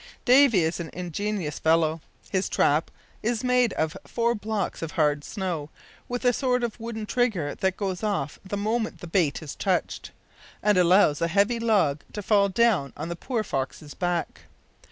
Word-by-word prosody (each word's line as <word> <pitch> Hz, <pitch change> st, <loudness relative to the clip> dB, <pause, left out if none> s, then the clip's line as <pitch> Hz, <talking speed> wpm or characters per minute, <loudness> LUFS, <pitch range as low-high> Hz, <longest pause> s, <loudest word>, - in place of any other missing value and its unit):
"Davy 250 Hz, -7 st, +6 dB
is 160 Hz, +2 st, -1 dB
an 170 Hz, -2 st, -5 dB
ingenious 180 Hz, -1 st, -3 dB
fellow. 160 Hz, 0 st, +2 dB, 0.3 s
His 190 Hz, 0 st, 0 dB
trap 150 Hz, +3 st, +2 dB, 0.3 s
is 230 Hz, +1 st, -1 dB
made 250 Hz, -2 st, +3 dB
of 160 Hz, +1 st, -1 dB
four 235 Hz, 0 st, 0 dB
blocks 210 Hz, -3 st, -3 dB
of 165 Hz, -1 st, -5 dB
hard 150 Hz, -3 st, +1 dB
snow, 175 Hz, -7 st, -4 dB, 0.4 s
with 245 Hz, +1 st, -3 dB
a 245 Hz, -, +5 dB
sort 250 Hz, 0 st, 0 dB
of 235 Hz, 0 st, -3 dB
wooden 225 Hz, -1 st, -5 dB
trigger 210 Hz, -11 st, 0 dB
that 190 Hz, -2 st, -1 dB
goes 190 Hz, -3 st, -3 dB
off 200 Hz, -10 st, -2 dB
the 200 Hz, +1 st, -4 dB
moment 220 Hz, +2 st, -2 dB
the -, -, -6 dB
bait 165 Hz, -4 st, 0 dB
is 150 Hz, -, -6 dB
touched, -, -, -1 dB, 0.5 s
and 210 Hz, 0 st, +4 dB
allows 180 Hz, -4 st, +4 dB
a 165 Hz, -, +2 dB
heavy 200 Hz, +7 st, +2 dB
log 200 Hz, -11 st, +2 dB
to 210 Hz, -, -5 dB
fall 200 Hz, -1 st, +3 dB
down 190 Hz, -, +2 dB
on 155 Hz, +3 st, -5 dB
the 170 Hz, -, -3 dB
poor 230 Hz, +5 st, -2 dB
fox's 140 Hz, -2 st, -4 dB
back. 175 Hz, -2 st, -2 dB
195 Hz, 175 wpm, -26 LUFS, 160-225 Hz, 0.5 s, Davy